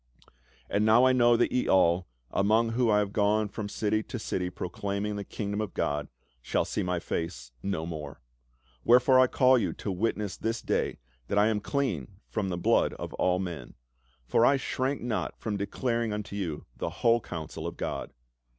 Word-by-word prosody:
"And 105 Hz, -, +1 dB
now 110 Hz, +3 st, +6 dB
I 130 Hz, -, +5 dB
know 120 Hz, -1 st, +5 dB
that 120 Hz, -, +2 dB
ye 125 Hz, -, +1 dB
all, 90 Hz, -1 st, +3 dB, 0.2 s
among 110 Hz, +4 st, +3 dB
whom 120 Hz, +1 st, +1 dB
I 105 Hz, -, +4 dB
have 105 Hz, -1 st, 0 dB
gone 105 Hz, 0 st, +2 dB
from 105 Hz, 0 st, -5 dB
city 110 Hz, +1 st, 0 dB
to 120 Hz, -, -6 dB
city 90 Hz, -4 st, -2 dB
proclaiming 100 Hz, +3 st, -3 dB
the 100 Hz, -, -4 dB
kingdom 100 Hz, +1 st, -3 dB
of 105 Hz, -, -5 dB
God, 75 Hz, 0 st, -1 dB, 0.3 s
shall -, -, 0 dB
see -, -, -2 dB
my 90 Hz, -1 st, -1 dB
face 65 Hz, -8 st, -4 dB
no 90 Hz, -5 st, -2 dB
more. 75 Hz, -4 st, -6 dB, 0.6 s
Wherefore 125 Hz, +2 st, +6 dB
I 130 Hz, -, +6 dB
call 130 Hz, 0 st, +4 dB
you -, -, -1 dB
to 100 Hz, -, -4 dB
witness 105 Hz, +1 st, -1 dB
this 115 Hz, 0 st, -2 dB
day -, -, 0 dB, 0.3 s
that 100 Hz, -, -1 dB
I 105 Hz, +2 st, +5 dB
am 110 Hz, -2 st, +1 dB
clean 105 Hz, -, -2 dB
from 95 Hz, +10 st, -2 dB
the 90 Hz, -, -2 dB
blood 85 Hz, -, +2 dB
of -, -, -7 dB
all 90 Hz, 0 st, +3 dB
men. 85 Hz, -10 st, -5 dB, 0.5 s
For 115 Hz, -, +3 dB
I 135 Hz, +3 st, +5 dB
shrank 135 Hz, +1 st, -2 dB
not 120 Hz, -3 st, -2 dB
from 110 Hz, -2 st, -3 dB
declaring 115 Hz, +3 st, -1 dB
unto 105 Hz, -1 st, -5 dB
you 85 Hz, -7 st, -4 dB
the -, -, -3 dB
whole 115 Hz, 0 st, +2 dB
counsel 80 Hz, -6 st, -6 dB
of -, -, -6 dB
God. -, -, -4 dB
105 Hz, 185 wpm, -28 LUFS, 90-115 Hz, 0.6 s, now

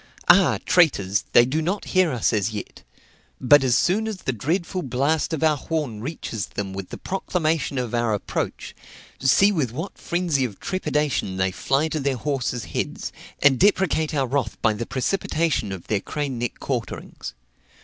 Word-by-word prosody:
Ah! 180 Hz, -9 st, +6 dB
traitors, 105 Hz, -, +3 dB
they 120 Hz, -, +7 dB
do 145 Hz, +6 st, -1 dB
not 185 Hz, +6 st, -2 dB
hear 185 Hz, -3 st, +4 dB
us 125 Hz, -3 st, +1 dB
as 105 Hz, -1 st, +1 dB
yet; 105 Hz, -2 st, -7 dB, 0.6 s
but 145 Hz, +2 st, +6 dB
as 125 Hz, -3 st, +3 dB
soon 215 Hz, +5 st, +1 dB
as 215 Hz, -3 st, -3 dB
the 130 Hz, -, -1 dB
dreadful 170 Hz, -, -2 dB
blast 140 Hz, +3 st, 0 dB
of 160 Hz, -1 st, -2 dB
our 155 Hz, -1 st, +4 dB
horn 145 Hz, -8 st, -3 dB
reaches 115 Hz, -7 st, -4 dB
them 95 Hz, -2 st, -5 dB
with 95 Hz, -1 st, -6 dB
the -, -, -7 dB
proclamation 165 Hz, -6 st, -1 dB
of 125 Hz, -3 st, -2 dB
our 120 Hz, -1 st, +1 dB
approach, 100 Hz, -, -4 dB, 0.4 s
see 165 Hz, +10 st, +5 dB
with 150 Hz, -, 0 dB
what 165 Hz, -, -6 dB
frenzy 170 Hz, -6 st, 0 dB
of 110 Hz, -6 st, -4 dB
trepidation 150 Hz, -, -1 dB
they 95 Hz, 0 st, +1 dB
fly 135 Hz, +10 st, 0 dB
to 155 Hz, -1 st, -2 dB
their 135 Hz, -2 st, 0 dB
horses' 125 Hz, -3 st, -2 dB
heads, -, -, -3 dB, 0.3 s
and 140 Hz, -3 st, +5 dB
deprecate 185 Hz, -6 st, +2 dB
our 135 Hz, -2 st, +2 dB
wrath 130 Hz, -3 st, -2 dB
by 110 Hz, -, +4 dB
the 110 Hz, +2 st, -5 dB
precipitation 155 Hz, -, 0 dB
of 95 Hz, -3 st, -7 dB
their 105 Hz, -3 st, 0 dB
crane 140 Hz, -3 st, -3 dB
neck 120 Hz, -1 st, -3 dB
quarterings. -, -, -5 dB
140 Hz, 170 wpm, -23 LUFS, 120-165 Hz, 0.6 s, they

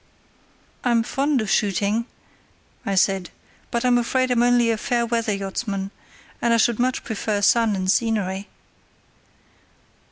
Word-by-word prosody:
"I'm 235 Hz, -2 st, +2 dB
fond 275 Hz, +2 st, 0 dB
of 215 Hz, -, -4 dB
shooting," 205 Hz, +3 st, +1 dB, 0.8 s
I 200 Hz, -, 0 dB
said, 190 Hz, -1 st, +1 dB, 0.4 s
"but 235 Hz, +1 st, -1 dB
I'm 245 Hz, -1 st, +4 dB
afraid 255 Hz, +2 st, 0 dB
I'm 240 Hz, -1 st, +3 dB
only 240 Hz, -1 st, +3 dB
a 225 Hz, -, 0 dB
fair 235 Hz, +2 st, 0 dB
weather 230 Hz, -1 st, -1 dB
yachtsman, 195 Hz, 0 st, -3 dB, 0.5 s
and 235 Hz, -1 st, +3 dB
I -, -, +3 dB
should 235 Hz, 0 st, +2 dB
much 255 Hz, +1 st, 0 dB
prefer 215 Hz, -2 st, -2 dB
sun 225 Hz, 0 st, +3 dB
and 185 Hz, -1 st, -3 dB
scenery." 205 Hz, -3 st, -1 dB
230 Hz, 135 wpm, -22 LUFS, 200-240 Hz, 0.8 s, I'm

